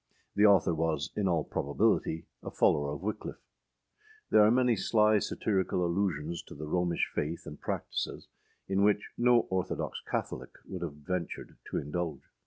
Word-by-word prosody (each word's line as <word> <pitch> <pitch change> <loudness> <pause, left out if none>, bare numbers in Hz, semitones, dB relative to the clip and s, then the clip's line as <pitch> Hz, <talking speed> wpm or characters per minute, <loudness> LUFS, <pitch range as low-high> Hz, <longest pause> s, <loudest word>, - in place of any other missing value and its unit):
The 105 +1 +6
author 95 -4 +5
was 80 -2 -1
in 100 -2 +1
all 85 -4 +2
probability 80 +3 0 0.2
a - - -6
follower 70 0 +2
of 85 - -9
Wickliffe. 105 +1 -5 0.9
There 105 - +7
are 105 - +6
many 125 0 +4
sly 105 +1 +3
satirical 95 -3 0
allusions 85 -3 -1
to - - -10
the 75 - -6
Romish 85 +2 +1
faith 80 +3 -2
and - - -9
practices, - - -3 0.4
in 95 0 +1
which 105 0 +2
no 120 0 +5
orthodox 95 0 -2
Catholic - - -3
would 90 -2 -6
have 85 -4 -3
ventured 85 +4 -4
to - - -2
indulge. 75 0 -3
90 Hz, 155 wpm, -30 LUFS, 80-105 Hz, 0.9 s, There